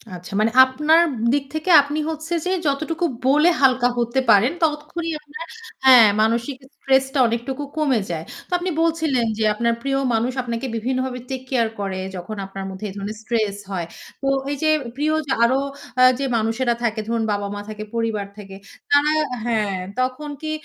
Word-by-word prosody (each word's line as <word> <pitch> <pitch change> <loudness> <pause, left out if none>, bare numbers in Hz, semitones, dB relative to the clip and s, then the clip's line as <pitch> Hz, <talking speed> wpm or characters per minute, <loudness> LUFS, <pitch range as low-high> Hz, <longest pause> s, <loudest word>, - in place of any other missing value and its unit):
আচ্ছা। 180 +2 -10
মানে 220 +1 +2
আপনার 300 +5 +3 0.3
দিক 285 -1 +1
থেকে 315 +4 -3
আপনি 290 +2 -3
হচ্ছে 320 +2 -5
যে 365 - 0 0.2
যতটুকু 315 +5 -1 0.2
বলে 300 +5 +5
হালকা 255 -2 +4
হতে 235 +2 0
পারেন, 220 +7 +5
ততক্ষণই 320 +2 -1
আপনার 300 +2 -9 0.4
হ্যাঁ, 245 -4 +9
মানসিক 235 +4 0 0.2
stress 270 -1 +2
টা 280 - 0
অনেকটুকু 240 +5 -3
কমে 280 -6 +2
যায়। 165 -1 -4 0.2
তো - - -29
আপনি 360 +1 -3
বলছিলেন, 315 -7 +1
যে 220 - 0
আপনার 235 +2 0
প্রিয় 275 0 -1 0.2
মানুষ 230 +3 +1
আপনাকে 235 +1 -4
বিভিন্ন 255 +3 -1
ভাবে 250 -1 -5
take 260 -1 -5
care 230 -3 +1
করে 195 -2 -3 0.2
যখন 185 +5 -6
আপনার 195 0 -7
মধ্যে 190 +2 -7
এ - - -7
ধরনের 205 +2 -5
stress 215 -4 -1
হয়। 175 -3 -2 0.4
তো 275 - -2 0.2
এই 285 - -2
যে 310 - +3 0.3
প্রিয় 300 +2 0
যে 265 - -3
আরো 260 +3 +3 0.4
আ - - +8 0.2
যে 275 - -1
মানুষেরা 225 +2 0
থাকে 225 -1 0
ধরুন 230 -1 0
বাবা-মা 205 0 -3
থাকে, 215 0 -6
পরিবার 225 -3 -1
থাকে 195 -2 -10 0.4
তারা 290 +1 +4 0.3
হ্যাঁ, 215 -5 0 0.2
তখন 260 +4 -2
কি 310 0 -3
250 Hz, 175 wpm, -21 LUFS, 220-290 Hz, 0.4 s, হ্যাঁ